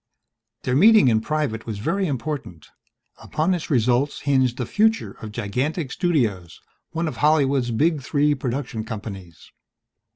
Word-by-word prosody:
Their 125 - 0
meeting 210 - +6
in 110 -1 +2
private 140 -5 -2
was 110 -2 -4
very 190 - -1
important. 130 - -5 0.5
Upon 160 +4 0
its 175 -3 -4
results 125 +2 +1
hinged 130 -3 +1
the 125 - -2
future 220 - +1
of 110 - -7
Gigantic 130 - -2
Studios, 110 - -1 0.3
one 165 +1 -2
of 155 - -5
Hollywood's 140 -4 +2
big 150 +6 +1
three 145 +2 +1
production 125 -3 -3
companies. 100 -6 -8
130 Hz, 135 wpm, -23 LUFS, 110-155 Hz, 0.5 s, meeting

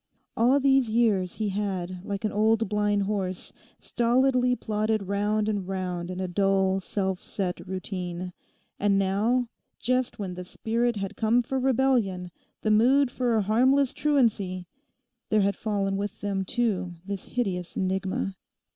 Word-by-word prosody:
All 250 +5 +4
these 270 -3 +3
years 215 -5 +2
he 215 -2 -1
had, 185 -3 -3
like 200 +1 -4
an 215 - 0
old 220 +1 +2
blind 205 0 +1
horse, 195 -3 -3 0.3
stolidly 250 +1 +2
plodded 215 -2 -1
round 205 +2 0
and 205 -4 -1
round 180 -2 -3
in 185 0 -5
a 185 - -1
dull 190 +1 +2
self 190 -1 -2
set 185 -3 -3
routine. 180 -1 -5 0.5
And 200 -1 +3
now, 210 +6 +1 0.3
just 255 0 0
when 195 -3 -4
the 180 0 -6
spirit 235 +5 -1
had 195 -2 -4
come 235 +2 +2
for 265 +3 -2
rebellion, 245 -9 +1 0.3
the 215 - +2
mood 250 +5 +4
for 245 -2 0
a 215 - +2
harmless 255 +6 +3
truancy, 210 -11 +1 0.6
there 215 -1 +3
had 200 0 +1
fallen 195 -2 -1
with 205 0 -4
them 195 -2 -2
too 190 -6 -1
this 200 -1 -5
hideous 185 -8 -3
enigma. 190 +1 -1
205 Hz, 145 wpm, -27 LUFS, 190-235 Hz, 0.6 s, All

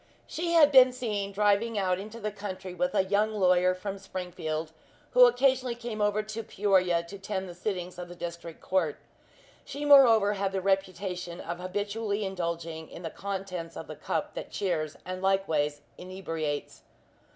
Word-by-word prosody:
She 340 +1 -2
had 305 -3 +7
been 260 -2 +8
seen 210 -6 -3
driving 210 +2 +2
out 185 -2 +1
into 215 +3 -8
the 215 -1 -3
country 190 -2 -6
with 270 +9 -1
a - - +4
young 205 +3 +1
lawyer 185 -2 +4
from 195 +1 -5
Springfield, 170 -5 -4 0.4
who 250 0 +8
occasionally 255 0 +2
came 235 -3 -5
over 210 +1 +2
to 215 +1 -5
Peoria 190 -5 +2
to 195 +4 -9
attend 190 -1 -4
the 175 - -8
sittings 180 -1 -4
of 175 0 -7
the 175 - -9
District 170 -1 -7
Court. 175 -6 0 0.7
She 285 +2 -6
moreover 230 -8 +7
had 195 -1 -2
the 195 - 0
reputation 185 -2 -1
of 170 +1 -5
habitually 205 +3 -2
indulging 170 -3 -4
in 175 - -10
the 165 - -4
contents 190 -4 -5
of - - -6
the - - -8
cup - - -3
that - - -6
cheers 160 -6 -2
and 185 0 -5
likewise 160 -7 +1 0.2
inebriates. 165 -5 -4
195 Hz, 165 wpm, -28 LUFS, 180-215 Hz, 0.7 s, been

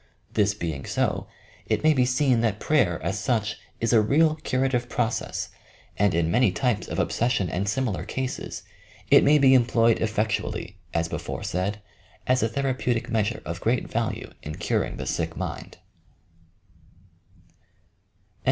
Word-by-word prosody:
This 105 -1 +2
being 80 -8 -4
so, - - -1 0.4
it - - 0
may 155 0 +6
be 130 -3 +3
seen 125 -2 +2
that 110 -3 0
prayer, 120 - +2
as 95 +5 -1
such, 105 0 -1 0.2
is 115 +1 +1
a 110 - +6
real 155 +8 +3
curative 130 -4 0
process 115 +1 -2 0.5
and 100 -4 +2
in 85 -1 +1
many 120 -1 +4
types 110 -1 0
of - - -4
obsession 110 -6 +1
and 95 +3 -1
similar 120 -3 -1
cases, 130 -1 -4 0.5
it - - +8
may 150 +2 +6
be 135 -2 +6
employed 115 -2 +4
effectually, 105 -3 -2
as 85 0 0
before - - -5
said, 100 +4 -2 0.4
as 130 0 +2
a 115 - +1
therapeutic 125 -3 -1
measure 110 0 0
of 85 +2 -5
great 120 +2 +1
value 115 0 -2
in 75 +1 -6
curing - - -1
the - - -5
sick - - -2
mind. - - -5
115 Hz, 145 wpm, -25 LUFS, 100-130 Hz, 0.5 s, it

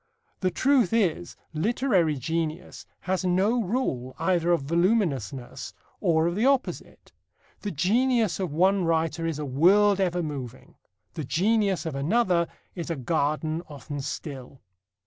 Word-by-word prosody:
The 185 - +1
truth 255 -1 +2
is, 180 -6 0 0.2
literary 185 - +1
genius 160 +4 -4
has 190 0 -1
no 190 +7 +2
rule 175 - -2
either 175 0 +1
of 170 -5 +2
voluminousness 155 - -1 0.2
or 160 -1 +2
of 170 - 0
the 215 - 0
opposite. 275 -2 -1 0.5
The 205 - -4
genius 220 - +1
of 185 -5 -2
one 185 +5 +3
writer 165 0 0
is 160 -3 -2
a 150 - -4
world 195 +9 +4
ever 180 -2 0
moving. 130 -5 -7 0.4
The 155 - -4
genius 195 - +1
of 160 - -3
another 170 +4 +1 0.3
is 175 -1 -6
a 165 - -1
garden 155 +3 -1
often 145 0 -6
still. 135 -2 -7
170 Hz, 135 wpm, -26 LUFS, 150-200 Hz, 0.5 s, world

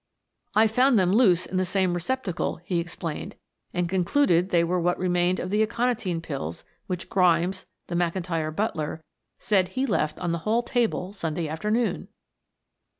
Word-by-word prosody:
"I 220 +1 +6
found 250 +3 +3
them 185 -1 +3
loose 195 -7 +4
in 185 - -3
the 185 - +2
same 185 -1 +1
receptacle," 180 +1 -2
he 175 -1 -1
explained. 170 -2 -5 0.4
"And 180 -1 -1
concluded 180 0 +2
they 170 -2 +3
were 180 +2 0
what 175 +1 +1
remained 180 0 +1
of 185 - -4
the 210 +1 +2
aconitine 225 -6 0
pills 135 - -5 0.2
which 180 -2 -4
Grimes, 180 0 +2 0.2
the - - -7
McIntyre 170 -2 -1
butler, 160 -6 -2 0.3
said 190 -4 +2
he 260 +1 -1
left 155 - 0
on 175 -2 -1
the 170 - -1
hall 220 +7 +1
table 230 -7 -1
Sunday 165 -4 -3
afternoon." 210 +10 -1
180 Hz, 155 wpm, -26 LUFS, 170-210 Hz, 0.4 s, I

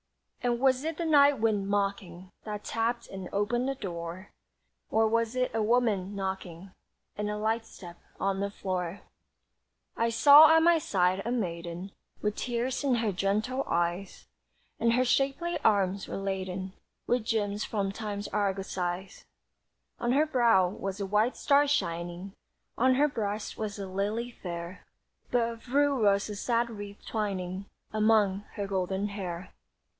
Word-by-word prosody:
And 240 -1 +1
was 260 0 +3
it 320 0 -3
the 340 - -2
night 290 -3 +5
wind 215 -3 +1
mocking 195 -3 -2
That 210 -1 -5
tapped 235 +1 -1
and 190 -2 -7
opened 240 +6 0
the 275 - -2
door, 175 -3 -6 0.6
Or 220 0 +3
was 230 +1 0
it 255 0 0
a 225 - 0
woman 210 -4 +1
knocking 190 -2 -5 0.4
And 210 0 -2
a 210 - -2
light 225 +1 -1
step 175 -2 -11 0.2
on 195 0 0
the 200 0 -1
floor? 185 -2 -4 0.9
I 230 0 +1
saw 290 +6 +8
at 320 - +5
my 340 -1 +5
side 185 -7 +1
a 235 - -2
maiden 175 -4 -3 0.3
With 210 0 -1
tears 245 +3 -2
in 270 -3 +3
her 225 -3 0
gentle 210 +8 0
eyes, 175 +3 -2 0.5
And 230 0 +3
her 255 +2 +3
shapely 275 +7 +1
arms 195 -2 +2
were - - -4
laden 190 -1 -3 0.3
With 245 -2 +1
gems 210 -2 -1
from 200 -3 -1
time's 205 -1 -5
argosies. 190 -2 -2 0.7
On 240 +1 +1
her 295 +3 +4
brow 235 -10 +4
was 195 +1 -5
a 200 - -2
white 210 +5 +1
star 285 0 +4
shining, 175 -5 -2 0.4
On 260 +2 +3
her 290 +3 +4
breast 210 -6 -3
was 215 -2 -4
a 200 - -4
lily 210 +6 -2
fair; 170 -3 -7 0.5
But 240 -2 +2
of 230 +1 -9
rue 285 -3 +3
was 200 -1 +3
a 210 - -5
sad 235 +3 0
wreath 205 -2 -9
twining 195 -3 -3 0.3
Among 210 -2 +3
her 200 - -3
golden 190 +1 -1
hair. 185 -3 -6
205 Hz, 155 wpm, -29 LUFS, 190-235 Hz, 0.9 s, saw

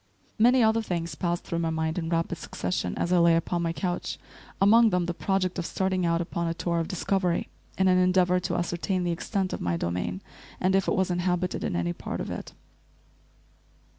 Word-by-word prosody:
Many 245 +2 +5
other 220 +1 +3
things 170 -6 -3
passed 175 +2 -2
through 170 - -3
my 165 -1 0
mind 160 +1 -1
in 165 -1 -3
rapid 165 0 -1
succession 90 -7 -3
as 175 - 0
I 180 - +5
lay 170 -1 +5
upon 170 +1 0
my 165 -1 0
couch, 175 +1 -3 0.4
among 225 +4 +6
them 180 -3 +1
the 175 - -2
project 185 0 -1
of 170 - -3
starting 190 -2 0
out 170 0 +1
upon 170 0 -2
a 165 - -2
tour 170 0 -1
of 165 - -2
discovery 185 -1 0 0.3
in 190 - +3
an 185 0 +5
endeavor 180 0 +3
to 180 - -2
ascertain 175 +2 -1
the 175 - 0
extent 190 +2 -2
of - - -4
my 85 -1 0
domain, 90 +2 -3 0.4
and 185 +1 +2
if 195 - +2
it - - +2
was 190 -1 +1
inhabited 180 0 -1
in - - -1
any 85 0 0
part - - -5
of - - -4
it. - - -6
175 Hz, 205 wpm, -27 LUFS, 165-185 Hz, 0.4 s, among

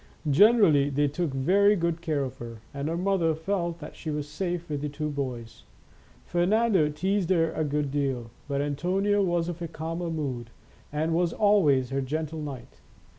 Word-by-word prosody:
Generally 170 - +5
they 145 +1 +1
took 160 +4 -2
very 195 +10 +4
good 170 -2 -1
care 155 -5 0
of 130 -1 -6
her, 115 -2 -9
and 140 +2 -3
her 165 - -1
mother 180 -3 +1
felt 170 0 -2
that 150 -3 -10
she 160 - -6
was 150 -1 -3
safe 175 +1 -3
with 145 -2 -3
the 150 - -2
two 150 +1 -3
boys. 125 -5 -5 0.6
Fernando 185 -1 +2
teased 185 +5 -1
her 165 -3 +3
a 160 - -1
good 145 -1 -1
deal, 135 -5 -2 0.2
but 140 -1 -1
Antonio 185 +8 +1
was 175 -2 0
of 175 0 -5
a 170 - -2
calmer 165 +2 -4
mood, 135 -7 -3 0.4
and 155 +2 0
was 170 0 +1
always 155 - +3
her 135 0 0
gentle 155 +3 -3
knight. 130 - -8
160 Hz, 175 wpm, -27 LUFS, 140-175 Hz, 0.6 s, Generally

